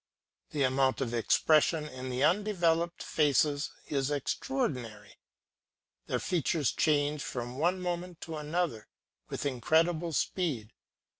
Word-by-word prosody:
The 145 -2 0
amount 130 0 +2
of 125 -4 -2
expression 155 +6 +3
in 130 -2 -7
these 125 +1 -1
undeveloped 175 -4 +2
faces 145 -1 +2 0.2
is 135 -1 -1
extraordinary; 135 - -3 0.9
their - - 0
features 160 -4 0
change 145 -1 +1
from 125 -1 -5
one 175 +4 +2
moment 175 -1 -4
to 160 -2 -5
another 150 -6 -2 0.4
with - - -4
incredible 160 +6 +1
speed. 140 - -1
150 Hz, 115 wpm, -30 LUFS, 130-170 Hz, 0.9 s, expression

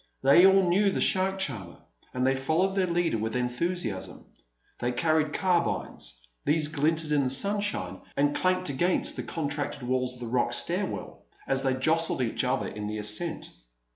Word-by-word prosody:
They 170 +7 +7
all 195 -1 +4
knew 200 +4 +3
the - - -2
shark 190 0 +2
charmer, 110 - -4 0.3
and 125 0 -1
they 135 - +3
followed 160 +8 +1
their 190 -2 +2
leader 170 -8 0
with 110 +2 -3
enthusiasm. 125 - -3 0.5
They 125 +1 -1
carried 155 +2 +1
carbines; 170 - -1 0.2
these 150 0 +2
glinted 155 +1 0
in 145 -2 +3
the 130 - 0
sunshine, 205 +9 0 0.2
and 145 +1 +2
clanked 185 -2 +1
against 175 +7 +1
the - - -3
contracted 145 -3 -4
walls 125 0 0
of - - -14
the 120 - -5
rock 120 +1 0
stairway - - -3 0.3
as 135 0 0
they 135 -1 +1
jostled 160 +1 +1
each 115 +3 -1
other 130 +1 0
in 105 0 -6
the 105 0 -4
ascent. 105 +11 -2
145 Hz, 170 wpm, -27 LUFS, 125-175 Hz, 0.5 s, They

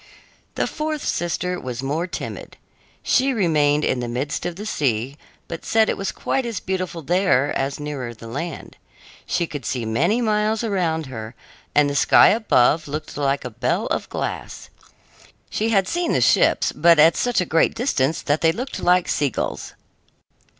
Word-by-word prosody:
The - - 0
fourth 305 -1 -3
sister 180 +1 -2
was 125 0 -5
more 155 +6 -1
timid. 175 - -7 0.5
She 270 +1 +2
remained 150 -6 +2
in 130 - 0
the 120 - -3
midst 130 +8 -3
of 175 - -5
the 205 +4 -7
sea, 130 - -1 0.3
but 165 - -7
said 220 -1 +2
it - - 0
was 195 -1 -2
quite 270 - -2
as 230 -4 -3
beautiful 185 -3 -4
there 175 -5 +2
as 135 +1 -2
nearer 145 -5 -5
the 115 0 -12
land. 145 +9 -6 0.5
She 170 - 0
could 145 -4 -7
see 125 -3 -3
many 165 - +1
miles 215 -1 +1
around 175 -7 -1
her, 115 -3 -8 0.4
and 150 -1 +5
the 145 - -2
sky - - +6
above 165 - +3
looked 150 +2 -6
like 140 -1 -1
a 125 - -5
bell 110 - -1
of - - -2
glass. - - -5 0.8
She 220 +2 0
had 195 -4 +2
seen 345 - -1
the - - +2
ships, - - +3
but 170 +1 +4
at 160 +2 +6
such 245 -3 +1
a 180 - +1
great 165 -1 +2
distance 165 - 0
that 145 +1 0
they 165 0 +4
looked 250 +10 -5
like 180 0 +3
sea 145 -2 +1
gulls. - - -4
165 Hz, 175 wpm, -22 LUFS, 140-195 Hz, 0.8 s, sky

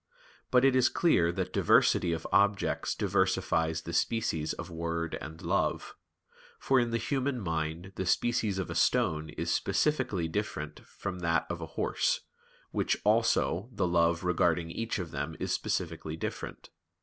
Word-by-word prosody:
But 125 +1 +4
it 135 -1 +4
is 125 -2 +5
clear 85 - +3
that - - -3
diversity 85 - +4
of 80 -1 -3
objects 100 +1 +2
diversifies 80 0 +1
the 85 - -6
species 85 -5 0
of - - -7
word 85 0 -3
and 80 +2 -8
love; - - 0 0.6
for 135 -1 +2
in 120 -1 +1
the 115 - 0
human 135 +1 -1
mind 80 0 -3
the 95 - -2
species 110 -1 +1
of 95 - -3
a - - -2
stone 75 -1 +1
is 85 +3 -2
specifically 105 - 0
different 80 -4 -4
from 95 -2 -6
that 85 -1 +1
of 85 -1 -4
a 80 - -5
horse, - - +1 0.5
which - - 0
also 115 +2 +2
the 105 - -1
love 85 0 +2
regarding 85 -1 +1
each 115 +5 -3
of 90 -5 -5
them 70 +3 -4
is - - -1
specifically 80 -3 -2
different. 80 - -6
85 Hz, 155 wpm, -30 LUFS, 80-115 Hz, 0.6 s, is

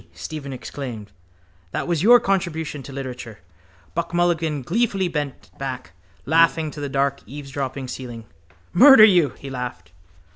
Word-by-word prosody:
Stephen 150 -3 -7
exclaimed. 125 -5 -7 0.6
That - - -2
was 170 -3 0
your 240 +5 +7
contribution 170 -8 -2
to 140 - -10
literature. 125 -4 -7 0.6
Buck 170 +1 -3
Mulligan 165 -5 +1
gleefully 195 - 0
bent 150 -5 -5
back, 130 -7 -5 0.3
laughing 160 0 +3
to 145 - -8
the 145 - -3
dark 140 +1 0
eavesdropping 135 -1 -5
ceiling. 120 -3 -7 0.5
—Murder 260 +2 +9
you! 175 - +4
he 135 - -9
laughed. 125 -10 -6
145 Hz, 135 wpm, -22 LUFS, 130-170 Hz, 0.6 s, Murder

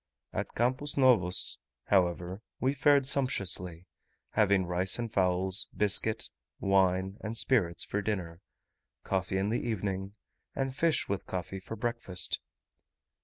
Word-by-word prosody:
At - - -4
Campos 130 +5 0
Novos, 115 -10 +3 0.2
however, 90 0 0 0.2
we 130 +2 +1
fared 140 -1 +4
sumptuously; 90 -10 0 0.5
having 100 -3 +3
rice 90 +1 +1
and 115 -2 -4
fowls, 95 +1 +2
biscuit, 105 +1 +4 0.3
wine, 95 0 +2
and 110 +1 -4
spirits, 105 -10 +1
for 105 - -2
dinner; 90 -5 -4 0.6
coffee 95 0 -1
in 95 +2 0
the 120 - 0
evening, 100 -3 -3 0.4
and 135 -1 -2
fish 165 +1 +1
with 100 -1 -3
coffee 95 +1 -4
for 105 +4 -8
breakfast. 110 -5 -2
100 Hz, 120 wpm, -30 LUFS, 90-120 Hz, 0.6 s, fared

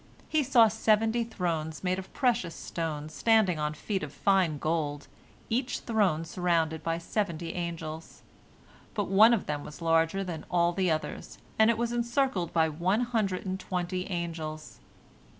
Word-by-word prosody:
He 310 - +2
saw 245 -4 +6
seventy 220 +2 +2
thrones 165 -8 -3
made 185 0 0
of 190 - -9
precious 230 - 0
stones, 155 -2 -4
standing 190 +1 +3
on 150 0 -1
feet 195 +4 -3
of 150 - -5
fine 185 -5 +2
gold, 145 -2 -2 0.4
each 250 +3 -1
throne 195 -9 +1
surrounded 165 -3 0
by 165 0 -1
seventy 170 -2 -3
angels. 165 -2 -6 0.7
But 205 -4 -1
one 210 +4 +7
of 230 -5 +1
them 145 -1 -3
was 150 - -10
larger 165 +3 +2
than 170 -5 -5
all 175 -1 +2
the 185 0 +1
others, 155 -1 -3 0.2
and 220 +1 +6
it 230 - +2
was 235 0 -1
encircled 235 -6 0
by 160 -1 +3
one 175 +8 0
hundred 220 -7 -1
and 190 0 -3
twenty 180 0 -3
angels. 165 -3 -5
180 Hz, 155 wpm, -29 LUFS, 160-215 Hz, 0.7 s, one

